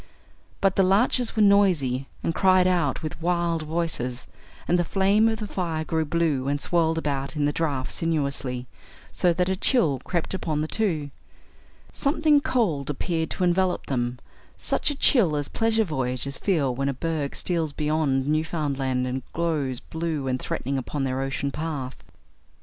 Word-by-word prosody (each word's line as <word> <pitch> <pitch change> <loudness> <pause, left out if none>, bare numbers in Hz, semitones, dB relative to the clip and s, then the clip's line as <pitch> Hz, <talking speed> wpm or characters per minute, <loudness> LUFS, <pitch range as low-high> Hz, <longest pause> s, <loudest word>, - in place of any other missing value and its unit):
But 195 -1 +2
the - - +6
larches 225 +5 +2
were 215 - +4
noisy 170 -11 +3 0.2
and 165 - 0
cried 185 0 +4
out 175 -7 +1
with 155 +1 -5
wild 170 -1 0
voices, 155 -6 -3 0.4
and 175 - +3
the - - +3
flame 200 +5 +3
of 220 - -1
the 215 - -4
fire 170 -5 -2
grew 160 0 -1
blue 150 -4 0
and 145 +1 0
swirled 165 0 +1
about 140 -2 -2
in 150 -1 +1
the 145 - +1
draught 140 -6 -1
sinuously, 140 -6 -1 0.5
so 180 - +2
that 180 +1 0
a 190 - +1
chill 180 - +3
crept 175 0 -2
upon 155 -5 -2
the 155 - -1
two. 160 -9 -1 0.8
Something 300 0 +2
cold 200 - 0
appeared 160 +3 -2
to 185 - -2
envelop 180 +1 +1
them 120 -2 -2 0.4
such - - 0
a 290 - -2
chill 210 - +4
as 145 -1 -1
pleasure 225 0 +1
voyagers 135 - -2
feel 150 -10 +1
when 135 +2 -1
a 135 - -2
berg 155 -1 -2
steals 165 -4 -1
beyond 150 -3 0
Newfoundland 145 -5 0
and 130 +1 -3
glows 150 -7 -1
blue 160 -2 -3
and 130 0 0
threatening 135 +2 -2
upon 135 +2 -3
their 130 0 -1
ocean 140 +1 -2
path. 145 -4 -5
160 Hz, 165 wpm, -25 LUFS, 140-180 Hz, 0.8 s, the